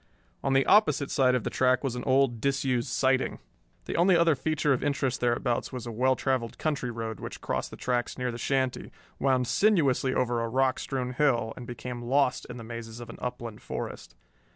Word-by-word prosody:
On 135 Hz, -, +1 dB
the 135 Hz, 0 st, +4 dB
opposite 150 Hz, -9 st, +4 dB
side 130 Hz, -2 st, +3 dB
of 125 Hz, -, -1 dB
the -, -, -3 dB
track 130 Hz, 0 st, +2 dB
was 130 Hz, -3 st, -1 dB
an 125 Hz, -, -4 dB
old, 130 Hz, -3 st, +2 dB
disused 135 Hz, -2 st, 0 dB
siding. 130 Hz, +2 st, +1 dB, 0.5 s
The -, -, -4 dB
only 175 Hz, +1 st, +5 dB
other 165 Hz, -1 st, +4 dB
feature 150 Hz, +1 st, +1 dB
of 130 Hz, -, -2 dB
interest 140 Hz, -3 st, -1 dB
thereabouts 120 Hz, 0 st, 0 dB
was 125 Hz, -3 st, -6 dB
a 120 Hz, -, -5 dB
well 130 Hz, +4 st, +2 dB
traveled 130 Hz, -4 st, -1 dB
country 145 Hz, -5 st, -1 dB
road 115 Hz, -2 st, -5 dB
which -, -, -7 dB
crossed -, -, -3 dB
the -, -, -10 dB
tracks 125 Hz, -1 st, -1 dB
near 125 Hz, -1 st, -1 dB
the 120 Hz, -, -7 dB
shanty, 130 Hz, -1 st, -1 dB, 0.3 s
wound 130 Hz, -2 st, +2 dB
sinuously 145 Hz, -, +2 dB
over 120 Hz, -2 st, +1 dB
a 115 Hz, -, -2 dB
rock 130 Hz, +2 st, +1 dB
strewn 125 Hz, -2 st, -3 dB
hill 125 Hz, -5 st, +1 dB
and 125 Hz, -, -9 dB
became 120 Hz, +1 st, -6 dB
lost 130 Hz, +2 st, +1 dB
in 125 Hz, -, -7 dB
the 115 Hz, -, -8 dB
mazes 115 Hz, 0 st, -7 dB
of 120 Hz, -, -8 dB
an -, -, -12 dB
upland 120 Hz, -3 st, -5 dB
forest. -, -, -6 dB
125 Hz, 200 wpm, -28 LUFS, 120-135 Hz, 0.5 s, only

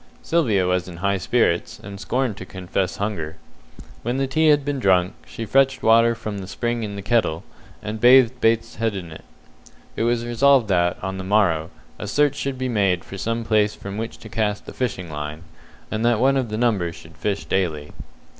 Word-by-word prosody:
Sylvia 115 Hz, -, +2 dB
was 90 Hz, 0 st, 0 dB
in 85 Hz, -2 st, -9 dB
high 100 Hz, +2 st, 0 dB
spirits, 90 Hz, -3 st, +1 dB
and 100 Hz, -1 st, -10 dB
scorned 125 Hz, 0 st, -1 dB
to -, -, -7 dB
confess 95 Hz, 0 st, -3 dB
hunger. 85 Hz, -7 st, -3 dB, 0.7 s
When 120 Hz, +3 st, -2 dB
the 135 Hz, -, +1 dB
tea 155 Hz, +4 st, +2 dB
had 145 Hz, -2 st, +4 dB
been 145 Hz, -2 st, -1 dB
drunk, 95 Hz, -4 st, +3 dB
she 115 Hz, -, -6 dB
fetched 135 Hz, +2 st, +2 dB
water 115 Hz, +1 st, +5 dB
from 110 Hz, -3 st, -5 dB
the 95 Hz, -, -7 dB
spring 120 Hz, +3 st, -2 dB
in 105 Hz, -2 st, -4 dB
the 100 Hz, -, -6 dB
kettle, 105 Hz, -9 st, +1 dB, 0.4 s
and 110 Hz, +1 st, -5 dB
bathed 125 Hz, 0 st, +6 dB
Bates's 115 Hz, 0 st, +1 dB
head 115 Hz, -2 st, 0 dB
with 90 Hz, -4 st, -6 dB
it. 80 Hz, -, -10 dB, 0.7 s
It -, -, -3 dB
was 120 Hz, 0 st, +1 dB
resolved 120 Hz, 0 st, +3 dB
that, 90 Hz, -2 st, +2 dB
on 95 Hz, 0 st, -3 dB
the -, -, -4 dB
morrow, 90 Hz, -5 st, +2 dB, 0.3 s
a 105 Hz, -, -5 dB
search 145 Hz, +6 st, +2 dB
should 140 Hz, -2 st, -3 dB
be 130 Hz, 0 st, -2 dB
made 100 Hz, -6 st, +1 dB
for 95 Hz, -, -8 dB
some 115 Hz, +2 st, -2 dB
place 105 Hz, -2 st, +2 dB
from 100 Hz, +2 st, -7 dB
which 115 Hz, +1 st, -5 dB
to -, -, -9 dB
cast 105 Hz, -2 st, -2 dB
the -, -, -9 dB
fishing 95 Hz, -9 st, -3 dB
line, 75 Hz, +1 st, -6 dB, 0.5 s
and 110 Hz, +1 st, -2 dB
that 120 Hz, -2 st, +3 dB
one 135 Hz, +2 st, +3 dB
of 130 Hz, -4 st, 0 dB
the 110 Hz, -, -3 dB
number 105 Hz, -8 st, +1 dB
should 80 Hz, -1 st, -14 dB
fish 100 Hz, -1 st, -2 dB
daily. 80 Hz, -6 st, -1 dB
105 Hz, 200 wpm, -22 LUFS, 95-120 Hz, 0.7 s, bathed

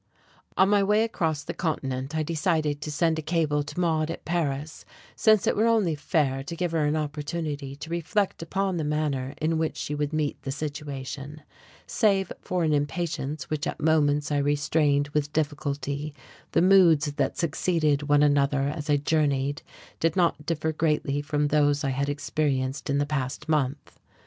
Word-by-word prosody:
On 190 Hz, -, +6 dB
my 205 Hz, 0 st, +4 dB
way 210 Hz, +2 st, +3 dB
across 160 Hz, -9 st, -1 dB
the -, -, -5 dB
continent 135 Hz, -3 st, -3 dB
I 155 Hz, -, +1 dB
decided 155 Hz, -2 st, 0 dB
to 150 Hz, -, -4 dB
send 160 Hz, +1 st, +1 dB
a -, -, -2 dB
cable 155 Hz, -2 st, +1 dB
to 150 Hz, +3 st, -6 dB
Maude 160 Hz, -3 st, +1 dB
at 165 Hz, -, -6 dB
Paris, 150 Hz, -3 st, -2 dB, 0.3 s
since 215 Hz, -2 st, +4 dB
it -, -, +2 dB
were 220 Hz, +2 st, +3 dB
only 215 Hz, -8 st, +3 dB
fair 145 Hz, -3 st, 0 dB
to 170 Hz, +4 st, -6 dB
give 175 Hz, 0 st, -1 dB
her 160 Hz, -2 st, +1 dB
an 150 Hz, -, +1 dB
opportunity 150 Hz, -2 st, -3 dB
to 155 Hz, +3 st, -9 dB
reflect 170 Hz, +4 st, -1 dB
upon 190 Hz, +2 st, -1 dB
the 160 Hz, -, -1 dB
manner 150 Hz, -3 st, -1 dB
in 160 Hz, +1 st, 0 dB
which 160 Hz, -1 st, -1 dB
she 150 Hz, -, -3 dB
would 145 Hz, 0 st, -1 dB
meet 155 Hz, -2 st, -1 dB
the -, -, -6 dB
situation. 145 Hz, 0 st, -6 dB, 0.4 s
Save 195 Hz, -4 st, +1 dB
for 180 Hz, -1 st, -1 dB
an 155 Hz, -1 st, +2 dB
impatience 150 Hz, 0 st, -2 dB
which 150 Hz, -1 st, -1 dB
at -, -, -4 dB
moments 150 Hz, -2 st, +2 dB
I 145 Hz, -, +2 dB
restrained 145 Hz, 0 st, +1 dB
with 150 Hz, 0 st, -1 dB
difficulty, 145 Hz, -1 st, -2 dB, 0.4 s
the -, -, +4 dB
moods 170 Hz, -6 st, +5 dB
that 140 Hz, -2 st, -1 dB
succeeded 155 Hz, -3 st, 0 dB
one 145 Hz, 0 st, +5 dB
another 145 Hz, -1 st, +3 dB
as 150 Hz, 0 st, -6 dB
I 145 Hz, -, +4 dB
journeyed 145 Hz, -1 st, 0 dB, 0.4 s
did 165 Hz, -1 st, +1 dB
not 170 Hz, -5 st, +1 dB
differ 160 Hz, -1 st, 0 dB
greatly 150 Hz, -2 st, 0 dB
from 145 Hz, 0 st, 0 dB
those 145 Hz, -1 st, +2 dB
I 135 Hz, -, 0 dB
had 140 Hz, +2 st, -1 dB
experienced 145 Hz, -2 st, -1 dB
in 140 Hz, -, +2 dB
the 145 Hz, -, +1 dB
past 145 Hz, 0 st, -3 dB
month. 145 Hz, -2 st, -1 dB
150 Hz, 175 wpm, -26 LUFS, 145-165 Hz, 0.4 s, On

